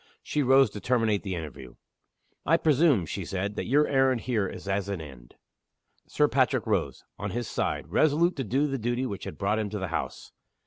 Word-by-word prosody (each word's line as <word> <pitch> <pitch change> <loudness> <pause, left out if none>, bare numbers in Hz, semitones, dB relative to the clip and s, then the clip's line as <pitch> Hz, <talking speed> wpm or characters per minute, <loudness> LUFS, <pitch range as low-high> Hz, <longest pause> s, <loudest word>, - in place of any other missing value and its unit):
She 150 - -1
rose 135 -3 +5
to 105 - -8
terminate 115 -5 +1
the 95 -3 -4
interview. 70 -6 -8 0.7
"I - - +4
presume," 145 - +3
she 95 +5 -4
said, 95 +3 -3
"that - - -3
your 145 +4 +3
errand 135 -3 +2
here 110 -6 0
is 100 - -9
as 100 0 -1
an 100 -3 -3
end." 65 -6 -12 0.7
Sir - - +2
Patrick - - +1
rose, - - -1 0.2
on - - -3
his 120 0 -3
side, - - -2
resolute 160 +4 +3
to 135 - -1
do 130 +6 +1
the 135 -2 -2
duty 120 +3 -1
which 100 -6 -5
had - - -7
brought 105 +2 0
him 105 -1 -2
to 105 - -4
the 95 -3 -4
house. 80 - -4
110 Hz, 200 wpm, -27 LUFS, 95-135 Hz, 0.7 s, rose